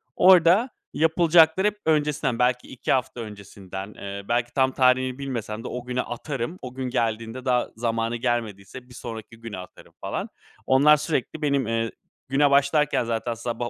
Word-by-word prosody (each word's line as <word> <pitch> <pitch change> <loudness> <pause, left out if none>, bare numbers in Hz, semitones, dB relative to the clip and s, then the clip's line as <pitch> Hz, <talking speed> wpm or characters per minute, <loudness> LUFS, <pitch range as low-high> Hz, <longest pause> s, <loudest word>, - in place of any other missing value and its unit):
orada 185 +6 +6 0.2
yapılacakları 165 +3 +4
hep 210 0 -2
öncesinden, 150 -6 +1
belki 125 0 +1
2 130 - -4
hafta 125 -2 0
öncesinden, 100 -2 -8
eee, 100 0 -7
belki 120 0 0
tam 130 -1 +2
tarihini 130 0 +2
bilmesem 115 -5 -4
de - - -5
o 125 0 -6
güne 125 0 -1
atarım. 135 +6 -5
O 125 -1 -7
gün 130 -1 -4
geldiğinde 115 +1 -2
daha 125 -1 +2
zamanı 115 0 -1
gelmediyse 120 0 -3
bir - - -14
sonraki 115 -1 -8
güne 115 -4 -7
atarım 90 - -12
falan. - - -4 0.4
Onlar 145 +3 +6
sürekli 155 0 -2
benim, 140 -5 +1
eee 115 0 -1 0.4
Güne 140 +1 +3
başlarken 140 -1 +3
zaten 115 +1 -2
sabah 120 +1 -4
125 Hz, 160 wpm, -24 LUFS, 115-140 Hz, 0.4 s, orada